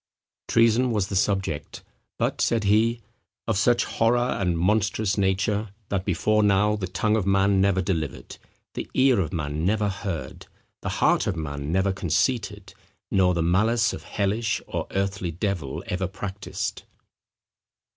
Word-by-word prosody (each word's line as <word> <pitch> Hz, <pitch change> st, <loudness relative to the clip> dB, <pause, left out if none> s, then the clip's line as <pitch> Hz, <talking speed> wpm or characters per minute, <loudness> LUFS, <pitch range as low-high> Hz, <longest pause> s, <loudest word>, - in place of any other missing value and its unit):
Treason 115 Hz, +2 st, +3 dB
was 105 Hz, -5 st, 0 dB
the 100 Hz, -, -3 dB
subject, 95 Hz, -5 st, -1 dB, 0.3 s
but, -, -, -1 dB
said 115 Hz, -2 st, +1 dB
he, 110 Hz, +3 st, +2 dB, 0.5 s
"of 115 Hz, -, +1 dB
such 120 Hz, +4 st, +3 dB
horror, 115 Hz, +2 st, +2 dB, 0.2 s
and 90 Hz, -3 st, 0 dB
monstrous 100 Hz, +2 st, +1 dB
nature, 100 Hz, +2 st, 0 dB, 0.2 s
that 95 Hz, -2 st, -1 dB
before 105 Hz, +3 st, +2 dB
now, 105 Hz, +1 st, +3 dB
the 100 Hz, -3 st, -3 dB
tongue 105 Hz, +4 st, 0 dB
of 105 Hz, -4 st, -1 dB
man 100 Hz, 0 st, +3 dB
never 95 Hz, -1 st, +2 dB
delivered, 80 Hz, -6 st, -3 dB, 0.4 s
the -, -, -5 dB
ear 130 Hz, -4 st, +4 dB
of 80 Hz, -5 st, -1 dB
man 75 Hz, -1 st, -3 dB
never 105 Hz, +3 st, +1 dB
heard, 95 Hz, -3 st, -5 dB, 0.3 s
the -, -, -3 dB
heart -, -, +2 dB
of 100 Hz, -, 0 dB
man 70 Hz, -2 st, -4 dB
never 95 Hz, +2 st, +1 dB
conceited, 100 Hz, -, -1 dB, 0.4 s
nor 90 Hz, -2 st, +3 dB
the 85 Hz, -, +1 dB
malice 110 Hz, +7 st, +2 dB
of -, -, -6 dB
hellish 105 Hz, +3 st, -1 dB
or -, -, -4 dB
earthly 95 Hz, -2 st, -2 dB
devil 85 Hz, -5 st, -3 dB
ever 90 Hz, +1 st, -2 dB
practised." 95 Hz, +1 st, -5 dB
100 Hz, 145 wpm, -25 LUFS, 90-110 Hz, 0.5 s, ear